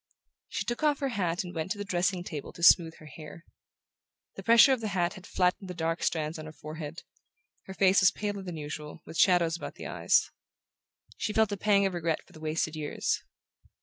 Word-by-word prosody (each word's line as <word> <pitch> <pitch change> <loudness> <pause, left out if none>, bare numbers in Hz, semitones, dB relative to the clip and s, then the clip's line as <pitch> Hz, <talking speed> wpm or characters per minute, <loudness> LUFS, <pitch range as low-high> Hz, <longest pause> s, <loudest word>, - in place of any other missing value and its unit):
She - - -3
took 240 0 -3
off 300 -2 +3
her 275 -1 -2
hat 180 -7 -1
and 180 0 -8
went 160 +2 -3
to - - -13
the 205 - -4
dressing 180 -1 0
table 150 -5 -6
to 170 - -9
smooth 165 -2 +6
her 155 - -15
hair. 155 +2 -11 0.9
The - - -7
pressure 235 +4 +7
of 255 - -2
the 220 - -2
hat 175 -1 +1
had 185 - -12
flattened 180 +1 0
the 180 - -6
dark 165 0 -2
strands 155 0 -1
on 155 - -8
her - - -8
forehead; 155 +1 -8 0.6
her 190 - -8
face 190 0 +4
was 185 - +7
paler 205 -1 -4
than 180 -3 -6
usual, 150 0 -7
with 160 - -7
shadows 175 -3 +4
about 170 - -7
the - - -9
eyes. - - +2 0.9
She 210 - -2
felt 220 -1 +3
a - - -1
pang 200 0 +3
of 190 - 0
regret 165 -2 -2
for - - -22
the 155 - -13
wasted 155 0 -1
years. 150 -1 -2
175 Hz, 215 wpm, -29 LUFS, 160-200 Hz, 0.9 s, pressure